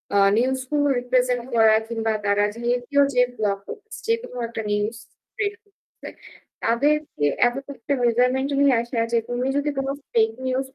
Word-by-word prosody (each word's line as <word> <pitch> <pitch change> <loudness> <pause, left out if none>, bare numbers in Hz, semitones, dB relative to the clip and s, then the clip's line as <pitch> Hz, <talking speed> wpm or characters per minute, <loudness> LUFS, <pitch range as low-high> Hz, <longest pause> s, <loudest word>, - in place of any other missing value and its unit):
আ - - +5 0.2
news 260 +2 +2
গুলো 290 -1 +2
represent 250 -1 +1
করা 220 -1 +6
কিংবা 225 -1 -1
তারা 205 0 +2
যেহেতু 245 +3 -2 0.2
যে 250 - +4 0.2
ব্লগ 200 -2 0 0.5
যেকোনো 455 - -2
একটা 225 - -4
নিউজ 210 +2 -1 0.4
বের 415 -1 -1
করতেসে, 410 -2 -14 0.5
তাদেরকে 285 - +1 0.2
এত 245 - -2 0.2
একটা 265 +3 -3
মেজারমেন্ট 250 +3 +2
নিয়ে 280 -1 +5
আসা 235 0 -4
যে, 235 - +3
"তুমি 245 +1 -1
যদি 285 +1 0
কোনো 270 0 -1 0.2
ফেক 225 -1 +3
নিউজ" 260 +1 0
245 Hz, 150 wpm, -23 LUFS, 230-275 Hz, 0.5 s, করা